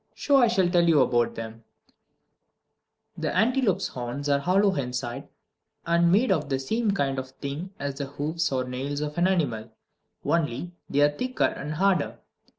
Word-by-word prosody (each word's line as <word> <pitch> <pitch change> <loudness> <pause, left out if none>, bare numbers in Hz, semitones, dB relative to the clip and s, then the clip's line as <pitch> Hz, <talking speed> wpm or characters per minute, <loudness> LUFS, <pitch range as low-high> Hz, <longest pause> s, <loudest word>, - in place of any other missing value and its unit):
So 285 -1 +3
I 245 -3 +6
shall 195 -6 +2
tell 175 -1 +3
you 155 -3 +5
about 120 -2 +2
them: 115 0 -7 1.5
1. - - -8
The - - -1
antelope's 220 -4 +2
horns 125 +3 -5
are 140 0 +3
hollow 190 +5 +3
inside, 125 -1 -4 0.6
and 170 0 +3
made 215 +4 +3
of 150 -6 0
the 135 - +1
same 220 - -1
kind 140 -9 0
of 130 0 -6
thing 140 +7 -6
as 140 0 -4
the 140 - -3
hoofs 150 +3 -2
or 130 -1 0
nails 135 +3 -4
of 150 +2 -3
an 175 - +4
animal, 125 -12 -1 0.6
only 165 0 0 0.2
they 145 - +2
are 145 0 +5
thicker 255 +8 -2
and 150 +2 -3
harder. 185 -3 +1
150 Hz, 170 wpm, -26 LUFS, 135-185 Hz, 1.5 s, I